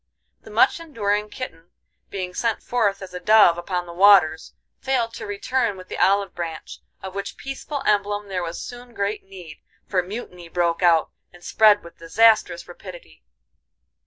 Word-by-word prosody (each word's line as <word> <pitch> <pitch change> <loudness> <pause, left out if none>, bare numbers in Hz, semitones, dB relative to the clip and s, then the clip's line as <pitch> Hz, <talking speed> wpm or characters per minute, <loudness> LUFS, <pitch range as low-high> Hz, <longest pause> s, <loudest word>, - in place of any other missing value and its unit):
The - - -14
much - - +3
enduring 210 -10 -2
kitten 175 -9 -8 0.4
being 185 -2 -5
sent 230 +2 -1
forth 205 -5 0
as 185 -1 -10
a 180 - -5
dove 180 -3 +5
upon 180 0 -3
the 170 - -10
waters 180 -4 +5 0.3
failed 245 -4 -1
to - - -7
return 205 +1 -1
with 185 0 -12
the - - -5
olive 200 +1 +2
branch; 165 -2 -6 0.2
of 190 -1 -6
which 200 0 -5
peaceful 270 +1 -6
emblem 205 0 0
there 190 -2 -3
was 170 0 -5
soon 245 -1 -10
great 200 +1 -2
need, 180 -5 -12 0.3
for 185 -2 +1
mutiny 180 -3 -8
broke 170 0 0
out, 170 -3 +3 0.2
and 175 0 -18
spread 210 -1 +4
with 170 - -14
disastrous 210 +2 +3
rapidity. 175 - -12
195 Hz, 160 wpm, -23 LUFS, 175-215 Hz, 0.4 s, dove